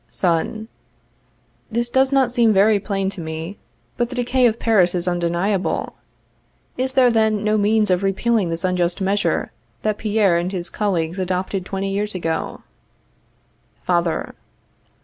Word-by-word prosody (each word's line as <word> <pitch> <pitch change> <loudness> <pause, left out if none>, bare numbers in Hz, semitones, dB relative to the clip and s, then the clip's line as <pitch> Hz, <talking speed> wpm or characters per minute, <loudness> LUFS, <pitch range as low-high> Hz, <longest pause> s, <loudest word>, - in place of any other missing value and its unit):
Son. 185 +5 -1 1.0
This 235 +2 0
does 265 +2 +2
not 270 -3 +3
seem 235 -3 +3
very 205 +1 +4
plain 195 -1 -2
to 190 - -5
me, 160 +4 -6 0.4
but 240 -1 0
the 250 - -7
decay 250 0 +2
of 225 -1 0
Paris 190 -7 +2
is 175 0 -2
undeniable. 175 +3 -1 0.8
Is 260 +1 0
there, 255 -2 +5
then, 220 -2 +2
no 215 0 +2
means 210 -1 +2
of 180 0 +2
repealing 195 0 +1
this 165 0 -3
unjust 180 -1 0
measure 200 +2 0 0.3
that 215 -1 -1
Pierre 210 -5 +2
and 175 +2 -2
his 180 -2 -4
colleagues 180 -4 -1
adopted 185 +1 -2
twenty 195 0 -3
years 205 +1 -2
ago? 165 -2 -3 1.2
_Father. 170 -2 0
200 Hz, 145 wpm, -21 LUFS, 180-220 Hz, 1.2 s, there